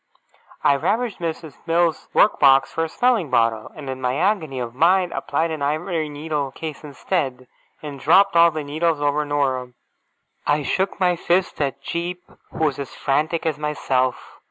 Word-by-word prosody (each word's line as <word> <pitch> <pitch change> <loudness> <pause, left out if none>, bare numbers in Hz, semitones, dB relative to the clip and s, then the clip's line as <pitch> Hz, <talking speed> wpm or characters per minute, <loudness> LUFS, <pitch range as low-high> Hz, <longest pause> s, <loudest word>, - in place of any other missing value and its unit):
I 140 - +4
ravaged 225 - -1
Miss 165 0 -3 0.2
Mills's 165 -1 +1
work 210 - +3
box 135 -1 +5
for 165 - 0
a - - -6
smelling 230 - +1
bottle, 115 -3 +1
and 145 -3 -9
in 130 0 -5
my 125 0 0
agony 165 -5 0
of 120 -2 -4
mind 175 +6 +3
applied 165 0 -1
an 155 -2 -4
ivory 155 +2 -1
needle 145 -1 -3
case 160 0 -7
instead, 140 -3 -3 0.4
and 145 -2 -7
dropped 190 +7 +4
all 170 0 +7
the 155 -2 -4
needles 155 +2 0
over 145 +1 +1
Dora. 130 -4 -1 0.7
I 145 0 +2
shook 190 +6 -1
my 180 -2 +3
fists 175 0 0
at 140 -3 -2
Jip, 175 +1 -3 0.3
who - - -4
was 145 -2 -1
as 140 - -6
frantic 155 +4 0
as 155 -2 -1
myself. 135 -4 -2
150 Hz, 170 wpm, -22 LUFS, 140-170 Hz, 0.7 s, all